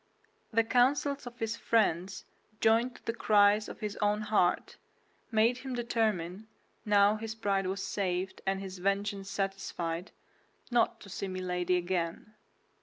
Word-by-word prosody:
The 230 0 +3
counsels 265 +3 +2
of 240 0 -9
his 225 0 -2
friend, 195 -6 +1 0.5
joined 230 +3 +3
to - - -17
the 230 - -1
cries 210 -1 +4
of - - -10
his 210 -1 -4
own 210 0 +1
heart, 210 -4 +1 0.5
made 230 +2 +3
him 260 -1 -5
determine, 215 -5 -1 0.4
now 205 0 +4
his 220 0 -5
pride 200 -3 0
was 190 +1 -2
saved 190 -1 -2
and 195 0 +1
his 190 -1 -7
vengeance 200 +1 -1
satisfied, 190 -3 -3 0.6
not 240 - +2
to 200 - -11
see 195 - -4
Milady 180 -1 -1
again. 175 +3 -2
205 Hz, 140 wpm, -31 LUFS, 190-225 Hz, 0.6 s, cries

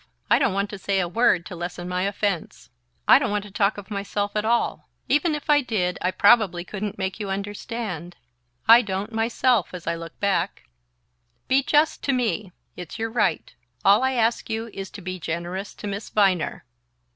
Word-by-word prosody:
I - - +6
don't - - +1
want 200 +1 -1
to 205 - -7
say 195 0 0
a 180 - 0
word 180 -3 +2
to 180 - -7
lessen 175 +1 -5
my 180 0 -1
offense. 200 -3 -3 0.4
I - - +8
don't - - -1
want 205 0 -1
to 205 - -11
talk 205 0 +1
of 205 0 -10
myself 205 0 -2
at 210 - +1
all. 235 +2 0 0.2
Even 300 +2 +2
if 295 - -7
I 295 -1 +5
did, 200 -8 -1
I 180 - +1
probably 185 -2 +4
couldn't 205 +2 -5
make 190 -1 -3
you 205 -2 -4
understand 195 -3 -5 0.5
I 230 +2 +9
don't, 205 +1 -4
myself, 225 -3 +1
as 175 - -8
I 170 - 0
look 165 0 -8
back. 200 -1 0 0.8
Be 265 +1 +4
just 300 +3 +2
to 275 - +2
me 215 -6 -1 0.2
it's 180 +1 -8
your 225 0 -3
right; 215 -8 0 0.3
all 200 +3 +6
I 260 0 +1
ask 235 -1 +1
you 225 0 -3
is 195 -1 -6
to 200 - -11
be 185 0 -5
generous 175 +4 -4
to - - -9
Miss 200 +1 -4
Viner..." 185 -8 +1
200 Hz, 190 wpm, -24 LUFS, 185-225 Hz, 0.8 s, I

